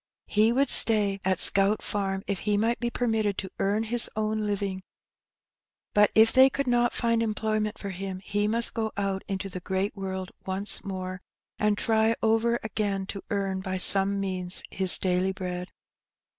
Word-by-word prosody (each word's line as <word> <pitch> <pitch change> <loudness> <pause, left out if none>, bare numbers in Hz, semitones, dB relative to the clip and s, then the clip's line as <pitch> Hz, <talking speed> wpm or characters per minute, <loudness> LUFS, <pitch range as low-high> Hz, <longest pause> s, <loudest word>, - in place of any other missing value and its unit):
He 215 +2 +2
would 275 +3 +1
stay 205 -3 +3
at 185 -1 0
Scout 200 +2 +2
Farm 195 -1 -2
if 200 -3 -3
he 210 -1 0
might 230 +3 0
be 240 - -1
permitted 220 -5 -1
to 190 - -5
earn 205 +3 0
his 235 +1 0
own 215 0 -1
living; 200 -2 -3 1.1
but 210 0 +5
if 220 +1 +5
they 260 +1 +7
could 280 +1 -3
not 240 -1 +2
find 230 -1 +1
employment 215 -1 -2
for 200 - -6
him 190 0 -6
he 205 +2 -1
must 230 +2 +4
go 220 -1 -2
out 195 -1 -2
into 195 0 -4
the 185 -1 -7
great 190 +3 -2
world 190 -1 -5
once 190 +2 -1
more, 185 -1 -6 0.4
and 210 -1 +1
try 220 +1 +2
over 225 +1 +2
again 205 -3 -2
to 195 0 -7
earn, 195 -2 -2
by 190 -1 -3
some 195 +1 +2
means, 185 -2 0
his 190 -2 +7
daily 185 +1 0
bread. 180 -1 -5
205 Hz, 170 wpm, -26 LUFS, 190-220 Hz, 1.1 s, they